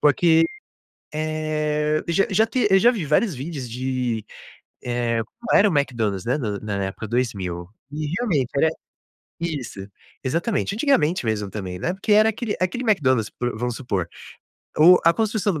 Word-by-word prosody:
porque, 160 Hz, +3 st, +4 dB, 0.7 s
eh, 155 Hz, 0 st, -1 dB
já 170 Hz, +4 st, +3 dB
já 220 Hz, +3 st, +3 dB
te 235 Hz, -1 st, +1 dB
eu 195 Hz, -, +6 dB
já 240 Hz, +5 st, +5 dB
vi 205 Hz, -9 st, -3 dB
vários 155 Hz, +6 st, +2 dB
vídeos 135 Hz, -1 st, -6 dB
de, 125 Hz, -2 st, -2 dB, 0.6 s
eh, 120 Hz, -1 st, -1 dB, 0.2 s
qual 235 Hz, -, +3 dB
era 205 Hz, -, +5 dB
o 170 Hz, -, 0 dB
McDonald's, 115 Hz, -9 st, -1 dB
né, 125 Hz, +5 st, 0 dB
na 105 Hz, -7 st, -3 dB
na 100 Hz, -2 st, -3 dB
época 95 Hz, +3 st, -6 dB
2000 100 Hz, -7 st, -2 dB, 0.2 s
e 150 Hz, 0 st, -3 dB
realmente 160 Hz, -, 0 dB
era 160 Hz, +3 st, +4 dB, 0.7 s
isso, 145 Hz, -11 st, -4 dB, 0.4 s
exatamente. 175 Hz, -, -1 dB
Antigamente 180 Hz, -, +2 dB
mesmo 105 Hz, -3 st, -1 dB
também, 95 Hz, -3 st, -5 dB
né, 175 Hz, -, -1 dB
porque 195 Hz, +3 st, -1 dB
era 215 Hz, +1 st, +6 dB
aquele 220 Hz, -1 st, -3 dB
aquele 185 Hz, +8 st, -1 dB
McDonald's 130 Hz, -, +2 dB
vamos 120 Hz, 0 st, -2 dB
supor, 100 Hz, -10 st, -2 dB, 0.7 s
o 175 Hz, +4 st, +8 dB
a 165 Hz, -, +6 dB
construção 215 Hz, -3 st, 0 dB
do 155 Hz, -, -4 dB
150 Hz, 160 wpm, -23 LUFS, 120-180 Hz, 0.7 s, o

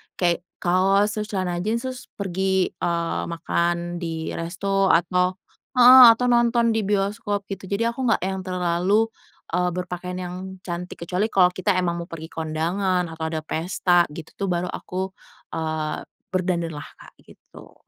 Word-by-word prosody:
kayak 175 Hz, 0 st, 0 dB, 0.2 s
kaos 195 Hz, +4 st, +2 dB
terus 210 Hz, 0 st, -2 dB
celana 180 Hz, -2 st, -1 dB
jeans, 230 Hz, +2 st, 0 dB
terus 255 Hz, -1 st, -6 dB
pergi, 190 Hz, -1 st, 0 dB
eee, 170 Hz, -1 st, -1 dB
makan 170 Hz, +1 st, -1 dB
di 160 Hz, -1 st, -4 dB
resto 195 Hz, +3 st, 0 dB
atau 180 Hz, +2 st, +2 dB, 0.4 s
heeh, 250 Hz, +1 st, +10 dB
atau 250 Hz, +2 st, -2 dB
nonton 235 Hz, -1 st, +3 dB
di 215 Hz, -3 st, 0 dB
bioskop 205 Hz, 0 st, -1 dB
gitu, 190 Hz, 0 st, -5 dB
jadi 230 Hz, +4 st, 0 dB
aku 255 Hz, +2 st, -4 dB
nggak 225 Hz, -, +2 dB
yang 190 Hz, 0 st, -2 dB
terlalu, 180 Hz, +4 st, +1 dB, 0.4 s
eee, 180 Hz, +1 st, +1 dB
berpakaian 180 Hz, 0 st, -5 dB
yang 180 Hz, 0 st, -5 dB, 0.3 s
cantik, 175 Hz, 0 st, -6 dB
kecuali 180 Hz, +5 st, 0 dB
kalau 180 Hz, -2 st, +6 dB
kita 185 Hz, +2 st, 0 dB
emang 175 Hz, -2 st, 0 dB
mau 170 Hz, -, -6 dB
pergi 160 Hz, -1 st, -8 dB
kondangan, 170 Hz, +4 st, -1 dB
atau 160 Hz, 0 st, -5 dB
ada 155 Hz, -, -2 dB
pesta 175 Hz, +2 st, +2 dB
gitu 165 Hz, -1 st, -9 dB
tuh -, -, -3 dB
baru 175 Hz, +1 st, -1 dB
aku, 190 Hz, +1 st, -4 dB, 0.4 s
eee, 155 Hz, -1 st, -3 dB, 0.3 s
berdandan 180 Hz, -2 st, 0 dB
lah 145 Hz, -, -7 dB
Kak, -, -, -15 dB
gitu. -, -, -16 dB
180 Hz, 155 wpm, -23 LUFS, 170-200 Hz, 0.4 s, heeh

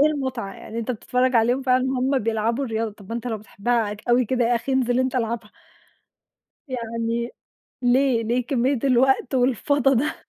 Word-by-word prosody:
إ -, -, +7 dB
إيه 295 Hz, -, +6 dB
المُتعة 260 Hz, -9 st, -2 dB
يعني؟ 230 Hz, -, -8 dB
أنت 230 Hz, +2 st, -3 dB
بتتفرّج 250 Hz, +2 st, +1 dB
عليهم 240 Hz, +4 st, +2 dB
فعلًا 255 Hz, -1 st, +2 dB
وهُم 265 Hz, +1 st, +1 dB
بيلعبوا 230 Hz, +3 st, 0 dB
الرياضة، 225 Hz, -2 st, -2 dB
طَب 205 Hz, -2 st, -16 dB
ما 230 Hz, -, -4 dB
أنت 235 Hz, +1 st, -4 dB
لو 225 Hz, -3 st, -2 dB
بتحبها 215 Hz, +1 st, -1 dB
ك 210 Hz, -, -16 dB
أوي 245 Hz, +1 st, +4 dB
كده 245 Hz, +1 st, 0 dB
يا 240 Hz, +1 st, +2 dB
أخي 240 Hz, +3 st, -2 dB
انزل 250 Hz, -2 st, +2 dB
أنت 260 Hz, 0 st, -1 dB
العبها. 230 Hz, -2 st, -2 dB, 1.2 s
يعني، 230 Hz, -1 st, -3 dB, 0.5 s
ليه، 245 Hz, -1 st, +3 dB
ليه 240 Hz, +2 st, 0 dB
كمية 260 Hz, 0 st, +1 dB
الوقت 265 Hz, 0 st, +3 dB
والفَضا 265 Hz, +2 st, +2 dB
ده؟ 290 Hz, +6 st, 0 dB
245 Hz, 180 wpm, -23 LUFS, 230-260 Hz, 1.2 s, إ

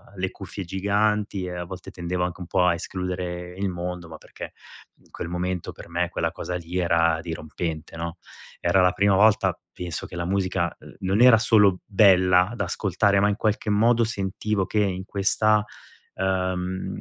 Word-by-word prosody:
le 95 Hz, 0 st, -2 dB
cuffie 95 Hz, +1 st, -7 dB
giganti 100 Hz, +1 st, 0 dB
e 90 Hz, -, -5 dB
a 90 Hz, 0 st, -4 dB
volte 95 Hz, +1 st, -9 dB
tendevo 90 Hz, 0 st, -3 dB
anche 90 Hz, 0 st, -3 dB
un 85 Hz, -, -6 dB
po' 90 Hz, -1 st, +2 dB
a 85 Hz, -, +4 dB
escludere 90 Hz, 0 st, -4 dB
il 100 Hz, -1 st, 0 dB
mondo. 90 Hz, -1 st, -5 dB
Ma 80 Hz, -1 st, -10 dB
perché -, -, -10 dB, 0.5 s
in -, -, -26 dB
quel -, -, -6 dB
momento 90 Hz, 0 st, -3 dB
per -, -, -12 dB
me 85 Hz, +1 st, -1 dB
quella 85 Hz, -2 st, -1 dB
cosa 90 Hz, -1 st, -5 dB
lì 90 Hz, +1 st, -4 dB
era 85 Hz, -2 st, +2 dB
dirompente, 80 Hz, -1 st, -5 dB
no, 85 Hz, +1 st, -5 dB, 0.4 s
era 95 Hz, -, +3 dB
la 90 Hz, 0 st, +4 dB
prima 100 Hz, +1 st, +2 dB
volta 110 Hz, +2 st, +4 dB, 0.2 s
penso 85 Hz, -3 st, -5 dB
che -, -, -10 dB
la 85 Hz, 0 st, -3 dB
musica, 95 Hz, -2 st, -1 dB
uhm, -, -, -14 dB
non 95 Hz, +4 st, +1 dB
era 125 Hz, -3 st, +8 dB
solo 105 Hz, -5 st, +4 dB
bella 95 Hz, -1 st, +4 dB
da -, -, -1 dB
ascoltare, 100 Hz, 0 st, +1 dB
ma 105 Hz, +1 st, +3 dB
in 100 Hz, -, 0 dB
qualche 110 Hz, -1 st, -1 dB
modo 115 Hz, +3 st, +4 dB
sentivo 100 Hz, -1 st, -1 dB
che 105 Hz, -, -1 dB
in 95 Hz, -2 st, 0 dB
questa, 105 Hz, +1 st, +2 dB, 0.5 s
uhm, 95 Hz, -1 st, -2 dB
95 Hz, 180 wpm, -24 LUFS, 90-100 Hz, 0.5 s, era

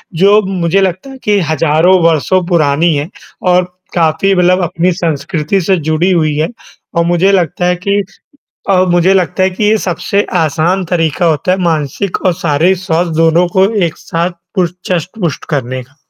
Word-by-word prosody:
जो 200 Hz, +5 st, +4 dB
मुझे 190 Hz, 0 st, 0 dB
लगता 190 Hz, +7 st, -2 dB
है 265 Hz, -, -10 dB
कि 210 Hz, -1 st, +2 dB
हज़ारों 165 Hz, +4 st, +3 dB
वर्षों 165 Hz, +3 st, +2 dB
पुरानी 160 Hz, -1 st, +2 dB
है 145 Hz, +5 st, -3 dB, 0.4 s
और 180 Hz, 0 st, +3 dB, 0.3 s
काफ़ी 165 Hz, +3 st, +2 dB
मतलब 180 Hz, +1 st, +3 dB
अपनी 175 Hz, +1 st, 0 dB
संस्कृति 165 Hz, +2 st, -2 dB
से 190 Hz, +3 st, +1 dB
जुड़ी 170 Hz, +4 st, +1 dB
हुई 155 Hz, -4 st, +1 dB
है। 155 Hz, +1 st, +1 dB, 0.5 s
अ, -, -, +4 dB
मुझे 175 Hz, +3 st, +2 dB
लगता 175 Hz, -1 st, 0 dB
है 180 Hz, 0 st, +2 dB
कि 200 Hz, +3 st, -1 dB, 0.7 s
अ, -, -, +4 dB, 0.2 s
मुझे 175 Hz, +2 st, +3 dB
लगता 185 Hz, 0 st, 0 dB
है 190 Hz, -, +2 dB
कि 190 Hz, +3 st, -3 dB
ये 215 Hz, +1 st, +3 dB
सबसे 200 Hz, +3 st, 0 dB, 0.2 s
आसान 170 Hz, +5 st, 0 dB
तरीका 165 Hz, +1 st, 0 dB
होता 165 Hz, +3 st, +1 dB
है 190 Hz, -, 0 dB
मानसिक 165 Hz, +3 st, -2 dB
और 185 Hz, -, +3 dB
शारीरिक 170 Hz, +6 st, +2 dB
स्वास्थ्य 170 Hz, -1 st, -1 dB
दोनों 165 Hz, +2 st, +3 dB
को 190 Hz, +1 st, +4 dB, 0.2 s
एक 160 Hz, -, -6 dB
साथ 170 Hz, -1 st, -2 dB, 0.2 s
पुश 180 Hz, -3 st, 0 dB, 0.2 s
चस्ट, 180 Hz, 0 st, -1 dB
पुष्ट 170 Hz, -5 st, -2 dB
करने 130 Hz, -3 st, -2 dB
का। 140 Hz, +4 st, -23 dB
175 Hz, 175 wpm, -13 LUFS, 160-185 Hz, 0.7 s, जो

